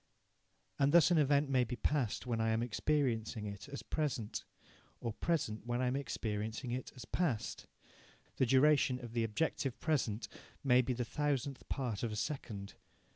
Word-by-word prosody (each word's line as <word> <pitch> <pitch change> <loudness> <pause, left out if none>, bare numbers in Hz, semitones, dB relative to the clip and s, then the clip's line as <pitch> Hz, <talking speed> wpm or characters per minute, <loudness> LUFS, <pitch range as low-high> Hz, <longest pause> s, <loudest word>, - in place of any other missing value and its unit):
And 140 0 +4
thus 170 +2 +6
an 170 - +5
event 145 0 +4
may 130 -2 +3
be 125 +1 -3
past 130 -5 0
when 115 -2 0
I 115 - +2
am 110 +1 +2
experiencing 120 -4 0
it 100 +4 -7
as 140 - -6
present, 130 -9 -2 0.5
or 115 - -3
present 115 -8 -1
when 120 0 0
I 130 - +1
am 125 +1 +1
experiencing 110 -2 -3
it 125 +2 -3
as 125 -2 -8
past. 145 -10 -1 0.7
The 130 - +3
duration 135 0 +5
of 120 -2 -8
the 115 -1 +1
objective 120 +3 -1
present 120 -9 0 0.4
may 125 -2 +6
be 125 +1 -1
the 125 0 -2
thousandth 140 +1 -2
part 125 -7 -2
of 115 - -1
a - - -3
second. 105 -4 -4
125 Hz, 170 wpm, -35 LUFS, 110-140 Hz, 0.7 s, thus